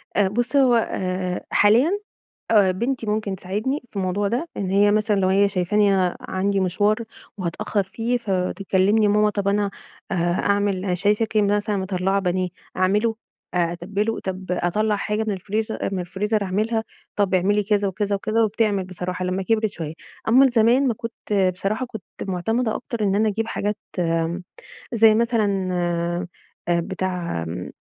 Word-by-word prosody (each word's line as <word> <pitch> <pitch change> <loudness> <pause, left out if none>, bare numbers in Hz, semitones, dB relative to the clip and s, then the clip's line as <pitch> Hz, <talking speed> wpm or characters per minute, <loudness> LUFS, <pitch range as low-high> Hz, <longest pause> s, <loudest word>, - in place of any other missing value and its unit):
أ 205 -2 +4
بُص، 240 +7 -1
هو 260 -3 +5
آآ 185 -5 -1
حاليًا 230 - +5 0.6
أ 205 -4 +5
بنتي 235 +5 -2
ممكن 210 -2 -1
تساعدني 210 +10 -3
في - - -29
الموضوع 195 +1 0
ده، 245 +11 -1
إن 195 -2 -2
هي 200 +2 +4
مثلًا 215 0 +2
لو 185 - +2
هي 195 +2 +4
شايفاني 200 +2 +2
أنا 185 -2 +1
عندي 195 +1 -1
مشوار 200 +3 +2 0.4
وهتأخّر 190 +3 -1
فيه 225 +6 -1
فتكلّمني: 195 0 +1
"ماما 210 +1 +3
طب 200 -1 -2
أنا 200 0 +1 0.4
أه - - +1
أعمل 185 +3 +1
أنا 180 - 0
شايفاكِ 210 +4 +1
مثلًا 205 0 +2
مطلّعة 190 0 0
بانيه 185 -1 0 0.3
أعمله؟ 210 +5 +2 0.4
أ 175 -2 +1
أتبِّله؟ 205 +6 -2
طب 190 0 -5
أطلّع 210 +4 +1
حاجة 210 +2 -1
من 210 - +1
الفريزر 215 +4 -2
أ - - -1
من 185 - -1
الفريزر 200 +4 -1
أعملها؟" 215 +4 0 0.3
طب 200 -2 +1
اعملي 200 +3 +3
كذا 205 0 +1
وكذا 200 +1 -1
وكذا 215 +3 +1
وبتعمل 210 -2 +1
بصراحة 180 0 -4
لمّا 185 +1 -1
كِبرِت 220 +2 +1
شوية. 160 -4 -5 0.3
أمّا 260 +5 +6
زمان 245 +3 +4
ما 235 - +2
كنت 205 -4 -1
بصراحة 205 +7 -2
كنت 220 -5 -9 0.2
مُعتمدة 220 +5 -1
أكتر 235 -4 -4
إن 195 -1 +2
أنا 215 +1 +3
أجيب 220 +2 -2
حاجات 210 -1 -2 0.2
م 165 +1 0 0.5
زي 225 -2 +6
مثلًا 230 -1 +2 1.2
أ 170 0 +3
بتاع 180 - -3
م 90 +2 -5
200 Hz, 160 wpm, -23 LUFS, 185-220 Hz, 1.2 s, أمّا